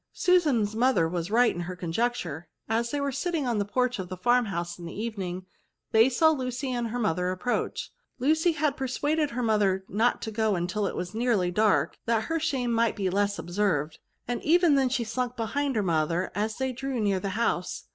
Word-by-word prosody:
Susan's 285 - +2
mother 230 -8 +3
was 170 +1 -3
right 240 +3 +4
in 175 - -4
her 180 +1 -5
conjecture; 175 -3 -2 0.2
as 230 +2 0
they 290 - -2
were 280 0 -1
sitting 330 +1 -1
in 235 -4 0
the - - +2
porch 250 +2 0
of 180 -1 -5
the 185 - -6
fitrmhouse 190 -7 0
in 170 - -8
the 170 - -7
evening, 190 -5 -4 0.5
they 225 +3 +6
saw 315 +5 +4
Lucy 260 -2 -3
and 240 -2 -1
her 235 +2 -4
mother 180 -5 0
approach* 185 +7 -2 0.3
Lucy 315 +6 +2
had 305 -3 0
per 265 -2 -3
suaded 295 +4 0
her 250 -1 -3
mother 200 -4 +2
not 230 +4 +1
to 220 - -5
go 210 -5 0
till 200 +3 -1
it - - -4
was 180 0 -4
nearly 220 -6 +1
dark, 210 +2 +2
that 225 -1 +2
her 325 +7 -1
shame 265 -6 -1
might 230 0 +2
be 190 -3 -1
less 200 +1 +1
observed; 175 -5 -1 0.3
and 245 0 -2
even 345 0 +4
then 270 -2 +3
she 245 -1 0
slunk 245 +2 -3
behind 270 +4 -1
her 215 - +1
mother 165 +1 0
as 215 +2 -2
they 265 0 -1
drew 265 0 -4
near 200 -3 +1
the 195 - -3
house. 185 -6 -1
225 Hz, 205 wpm, -27 LUFS, 185-255 Hz, 0.5 s, they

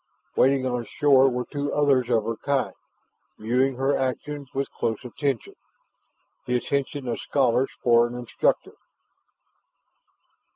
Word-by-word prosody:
Waiting 135 0 +3
on 125 -2 -1
shore 135 +1 +4
were 125 -1 -3
two 145 -1 -2
others 135 -4 +2
of 115 -3 +2
her 115 +1 -2
kind, 140 +2 -1 0.6
viewing 125 +4 +1
her 135 +2 +1
actions 135 +2 -3
with 135 +1 -2
close 110 -1 -2
attention, 135 0 -3 0.9
the 125 - +1
attention 140 +1 -2
of 120 - -2
scholars 130 -1 +1
for 120 -1 +5
an 120 - -8
instructor. 125 -1 -1
130 Hz, 125 wpm, -25 LUFS, 120-140 Hz, 0.9 s, for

